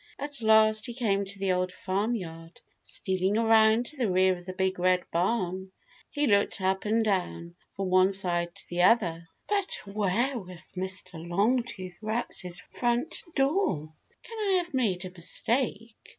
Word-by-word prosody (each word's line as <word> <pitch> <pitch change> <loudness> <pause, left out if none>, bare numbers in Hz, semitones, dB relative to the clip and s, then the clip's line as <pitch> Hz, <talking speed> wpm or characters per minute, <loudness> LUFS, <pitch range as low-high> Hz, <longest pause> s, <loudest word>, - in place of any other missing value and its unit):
At 285 -2 -7
last 220 -1 +4
he 240 - -6
came 200 -5 0
to 200 +1 -5
the 195 -1 0
Old 180 0 0
Farm 200 +6 -1
Yard. 165 -4 -8 0.2
Stealing 190 +2 -1
around 225 +1 +4
to 300 - -7
the 240 -5 0
rear 185 0 +3
of 175 0 -13
the 185 - -4
Big 190 0 -1
Red 180 0 +3
Barn, 185 0 -1 0.4
he 295 0 0
looked 200 -5 +2
up 190 +1 0
and 220 +1 +2
down, 175 -4 -2 0.2
from 195 -1 -3
one 185 +1 +5
side 175 -3 -1
to - - -11
the 175 0 -1
other, 175 -5 +3 0.2
but 400 -2 0
where 215 +6 0
was 180 -4 -6
Mr. 185 -2 -1
Longtooth 190 0 -1
Rat's 215 -5 0
front 245 +6 0
door? 270 - 0 0.3
"Can 455 -1 -9
I 405 -2 +1
have 345 -2 -16
made 200 -8 0
a 185 - -7
mistake?" 225 +5 -2
195 Hz, 165 wpm, -28 LUFS, 180-230 Hz, 0.4 s, one